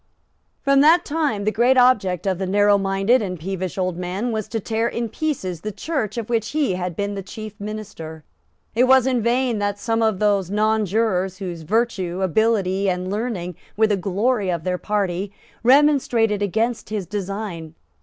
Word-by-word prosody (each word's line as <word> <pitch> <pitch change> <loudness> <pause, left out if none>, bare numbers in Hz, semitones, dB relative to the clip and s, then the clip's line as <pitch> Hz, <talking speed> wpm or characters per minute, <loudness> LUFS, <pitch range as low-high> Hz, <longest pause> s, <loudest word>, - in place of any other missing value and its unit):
From 275 0 +4
that 330 +4 +5
time 290 -9 -1
the 215 - +1
great 245 +4 +3
object 205 -9 +3
of 190 -2 0
the 190 - -2
narrowminded 200 +3 +3
and 180 -4 -4
peevish 185 +1 -4
old 185 -2 -1
man 185 +7 -3
was 215 -2 -3
to 225 - -3
tear 225 +2 -1
in 235 -1 -3
pieces 210 - -3
the 215 - -4
Church 240 - -3
of 230 -2 -3
which 230 0 -1
he 295 -10 +1
had 180 -1 -3
been 205 +2 -2
the 200 - -4
chief 215 +2 -8
minister. 200 -7 -7 0.5
It 245 +3 +4
was 260 -1 +5
in 255 -3 +1
vain 240 0 +1
that 205 0 -1
some 225 +2 -1
of 220 -3 +2
those 200 -3 +1
nonjurors, 210 -2 +1
whose 180 -4 -6
virtue, 190 -1 -1
ability 195 0 +1
and 180 +1 -2
learning 205 -5 -3 0.2
were 220 - +5
the 210 -1 +2
glory 200 +3 0
of 170 -3 -2
their 180 0 -1
party, 200 -2 -2 0.3
remonstrated 250 -5 +3
against 225 +4 -1
his 210 -3 -3
design. 195 -4 -5
205 Hz, 175 wpm, -22 LUFS, 185-230 Hz, 0.5 s, that